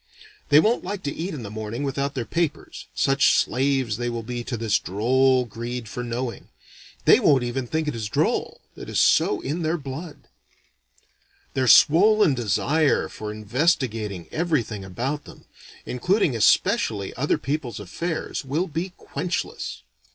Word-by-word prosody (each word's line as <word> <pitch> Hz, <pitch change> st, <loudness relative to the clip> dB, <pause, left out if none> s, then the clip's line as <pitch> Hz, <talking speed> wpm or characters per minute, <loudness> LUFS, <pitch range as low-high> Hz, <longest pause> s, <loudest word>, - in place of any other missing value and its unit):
They 145 Hz, -, +7 dB
won't 220 Hz, +8 st, +2 dB
like 190 Hz, +1 st, -5 dB
to 140 Hz, -, -2 dB
eat 170 Hz, +1 st, -4 dB
in 130 Hz, -, -7 dB
the 100 Hz, -, -7 dB
morning 110 Hz, +4 st, -5 dB
without 140 Hz, 0 st, -2 dB
their 125 Hz, -3 st, -2 dB
papers, 160 Hz, +5 st, -3 dB
such 135 Hz, 0 st, +3 dB
slaves 130 Hz, -4 st, +1 dB
they 120 Hz, 0 st, -2 dB
will 115 Hz, -1 st, -4 dB
be 120 Hz, +1 st, -5 dB
to 120 Hz, -, -3 dB
this 110 Hz, -2 st, +1 dB
droll 125 Hz, +6 st, +2 dB
greed 120 Hz, +1 st, -6 dB
for 125 Hz, +3 st, -5 dB
knowing. 120 Hz, 0 st, -4 dB, 0.6 s
They -, -, +7 dB
won't 135 Hz, -4 st, +4 dB
even 120 Hz, +1 st, -3 dB
think 160 Hz, +3 st, -1 dB
it 150 Hz, -, -1 dB
is 110 Hz, -2 st, -4 dB
droll, -, -, -1 dB
it -, -, -9 dB
is -, -, 0 dB
so 105 Hz, -, +3 dB
in 155 Hz, +6 st, -3 dB
their 160 Hz, +1 st, 0 dB
blood. 145 Hz, +3 st, -8 dB, 1.3 s
Their 130 Hz, -1 st, 0 dB
swollen 200 Hz, -, +6 dB
desire 135 Hz, +7 st, +1 dB
for 105 Hz, -1 st, -6 dB
investigating 110 Hz, -, -1 dB
everything 145 Hz, -, -1 dB
about 125 Hz, +10 st, -4 dB
them, -, -, -14 dB, 0.4 s
including 155 Hz, -, +1 dB
especially 105 Hz, -2 st, +2 dB
other 140 Hz, +4 st, +1 dB
people's 130 Hz, -4 st, -3 dB
affairs, 155 Hz, -, -4 dB
will 145 Hz, +7 st, -1 dB
be 170 Hz, +3 st, -4 dB
quenchless. 170 Hz, -, -4 dB
130 Hz, 150 wpm, -24 LUFS, 115-155 Hz, 1.3 s, They